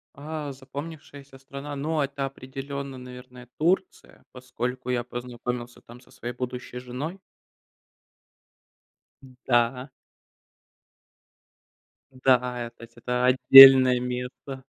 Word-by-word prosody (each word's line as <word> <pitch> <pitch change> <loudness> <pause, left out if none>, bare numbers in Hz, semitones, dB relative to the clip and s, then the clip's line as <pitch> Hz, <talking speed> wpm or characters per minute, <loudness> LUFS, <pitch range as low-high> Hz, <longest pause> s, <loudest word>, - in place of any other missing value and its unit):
А, 150 0 -6
запомнившаяся 140 0 -10
страна, 140 +2 -9
но 155 +1 -1
это 140 0 -4
определенно, 135 +1 -7
наверное, 125 0 -12
Турция, 180 +4 -2
поскольку 125 0 -6
я 125 -1 -1
познакомился 120 0 -7
там 120 +1 -15
со 130 - -23
своей 120 -1 -7
будущей 125 0 -7
женой. 135 +9 -7 2.0
Н 130 -1 -16
да. 125 +2 +1 2.2
Да, 130 0 +3 0.3
а, - - -8
тать 115 0 -15
это 125 +1 -2
отдельное 130 0 +8
место. 125 +2 -6
130 Hz, 100 wpm, -25 LUFS, 125-140 Hz, 2.2 s, отдельное